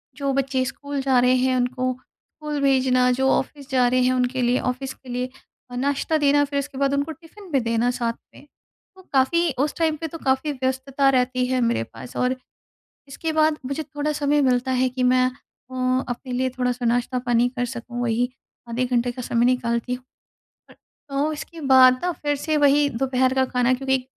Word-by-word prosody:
जो 275 Hz, -1 st, -1 dB
बच्चे 270 Hz, -1 st, 0 dB
स्कूल 285 Hz, +1 st, -5 dB
जा 265 Hz, -2 st, +3 dB
रहे 250 Hz, +1 st, +4 dB
हैं, 255 Hz, 0 st, +2 dB
उनको 250 Hz, +1 st, 0 dB
स्कूल 300 Hz, +1 st, -8 dB
भेजना, 260 Hz, -2 st, +3 dB
जो 265 Hz, +2 st, +1 dB
ऑफ़िस 280 Hz, 0 st, -2 dB
जा 255 Hz, -2 st, +3 dB
रहे 255 Hz, +1 st, +2 dB
हैं, 255 Hz, 0 st, +3 dB
उनके 255 Hz, 0 st, 0 dB
लिए 245 Hz, +1 st, +2 dB
ऑफ़िस 260 Hz, +1 st, -3 dB
के 260 Hz, -, -16 dB
लिए 250 Hz, +1 st, -2 dB, 0.5 s
नाश्ता 285 Hz, +4 st, 0 dB
देना, 290 Hz, -1 st, +3 dB
फिर 280 Hz, 0 st, -2 dB
उसके 280 Hz, -1 st, -6 dB
बाद 275 Hz, 0 st, +1 dB
उनको 285 Hz, +3 st, -1 dB
टिफिन 340 Hz, +5 st, -14 dB
भी 275 Hz, -, +3 dB
देना 230 Hz, 0 st, +1 dB
साथ 235 Hz, -1 st, -2 dB, 0.2 s
में। -, -, -15 dB, 0.5 s
तो 375 Hz, -, -15 dB
काफ़ी, 325 Hz, +6 st, +3 dB
उस 290 Hz, +2 st, +1 dB
टाइम 320 Hz, -2 st, +1 dB
पे 325 Hz, +1 st, -4 dB
तो 330 Hz, -, -8 dB
काफ़ी 270 Hz, 0 st, 0 dB
व्यस्तता 265 Hz, +1 st, 0 dB
रहती 255 Hz, -1 st, +1 dB
है, 255 Hz, 0 st, 0 dB
मेरे 235 Hz, -, +1 dB
पास 115 Hz, +2 st, -12 dB
और 250 Hz, +1 st, +1 dB, 0.7 s
इसके 320 Hz, +4 st, -4 dB
बाद 310 Hz, 0 st, +2 dB
मुझे 280 Hz, +4 st, -3 dB
थोड़ा 295 Hz, +1 st, -3 dB
समय 295 Hz, 0 st, +1 dB
मिलता 255 Hz, -1 st, +1 dB
है 255 Hz, 0 st, +2 dB
कि 255 Hz, 0 st, -4 dB
मैं 255 Hz, 0 st, +4 dB, 0.4 s
अ, 255 Hz, -, -9 dB, 0.3 s
अपने 245 Hz, +1 st, -5 dB
लिए 255 Hz, +1 st, 0 dB
थोड़ा-सा 250 Hz, -1 st, -2 dB
नाश्ता 245 Hz, +2 st, +1 dB
पानी 240 Hz, 0 st, +3 dB
कर 245 Hz, 0 st, -3 dB
सकूँ, 240 Hz, -1 st, -6 dB
वही 240 Hz, +1 st, +1 dB, 0.4 s
आधे 240 Hz, +2 st, -1 dB
घंटे 245 Hz, 0 st, +1 dB
का 250 Hz, -, -7 dB
समय 235 Hz, 0 st, +1 dB
निकालती 245 Hz, -1 st, 0 dB
हूँ। 250 Hz, 0 st, -10 dB, 0.7 s
और -, -, -17 dB, 0.3 s
तो 280 Hz, +3 st, 0 dB
इसके 325 Hz, +2 st, -8 dB
बाद 255 Hz, -1 st, +7 dB
न 360 Hz, -, +1 dB
फ़िर 290 Hz, -2 st, -2 dB
से 310 Hz, +2 st, -1 dB
वही 290 Hz, 0 st, +4 dB
दोपहर 260 Hz, 0 st, +1 dB
का 265 Hz, 0 st, +3 dB
खाना, 250 Hz, 0 st, +1 dB
क्योंकि 265 Hz, 0 st, 0 dB
260 Hz, 195 wpm, -23 LUFS, 250-280 Hz, 0.7 s, बाद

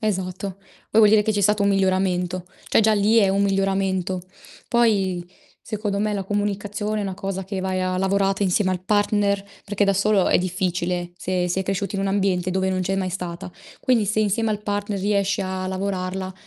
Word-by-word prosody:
Esatto. 190 Hz, -2 st, -3 dB, 0.3 s
O -, -, +1 dB
vuol 215 Hz, -2 st, +7 dB
dire 215 Hz, -1 st, +5 dB
che 215 Hz, +1 st, 0 dB
c'è 205 Hz, -, 0 dB
stato 210 Hz, +1 st, +3 dB
un 200 Hz, -, +3 dB
miglioramento 185 Hz, -2 st, +1 dB, 0.2 s
cioè, -, -, +4 dB
già 220 Hz, 0 st, +4 dB
lì 215 Hz, +2 st, +3 dB
è 200 Hz, -3 st, +5 dB
un 195 Hz, +1 st, +2 dB
miglioramento. 195 Hz, -2 st, 0 dB, 0.5 s
Poi, 195 Hz, -7 st, +2 dB, 0.4 s
secondo 210 Hz, -2 st, -3 dB
me, 210 Hz, 0 st, 0 dB
la 195 Hz, -2 st, -2 dB
comunicazione 205 Hz, +1 st, -2 dB
è 205 Hz, -, -2 dB
una 195 Hz, -, -3 dB
cosa 190 Hz, 0 st, -4 dB
che 195 Hz, -1 st, -4 dB
vai 190 Hz, 0 st, -1 dB
a 185 Hz, 0 st, -1 dB
lavorata 195 Hz, +1 st, +1 dB
insieme 185 Hz, 0 st, +2 dB
al 185 Hz, -1 st, -3 dB
partner, 205 Hz, 0 st, +1 dB, 0.2 s
perché 205 Hz, 0 st, 0 dB
da 200 Hz, -, +3 dB
solo 200 Hz, 0 st, +2 dB
è -, -, +4 dB
difficile 180 Hz, -1 st, -2 dB
se 180 Hz, 0 st, -1 dB
sei 185 Hz, +2 st, -1 dB
cresciuto 195 Hz, +1 st, -2 dB
in 195 Hz, -, -1 dB
un 195 Hz, -, 0 dB
ambiente 190 Hz, -2 st, 0 dB
dove 190 Hz, 0 st, 0 dB
non 185 Hz, 0 st, 0 dB
c'è 190 Hz, +1 st, -1 dB
mai 185 Hz, -1 st, -1 dB
stata. 180 Hz, -1 st, -5 dB, 0.3 s
Quindi 235 Hz, -5 st, +2 dB
se 210 Hz, +2 st, 0 dB
insieme 215 Hz, +2 st, +1 dB
al 210 Hz, 0 st, -3 dB
partner 205 Hz, -1 st, -2 dB
riesci 200 Hz, 0 st, +1 dB
a 185 Hz, -1 st, -3 dB
lavorarla, 190 Hz, 0 st, -3 dB
195 Hz, 195 wpm, -23 LUFS, 185-205 Hz, 0.5 s, vuol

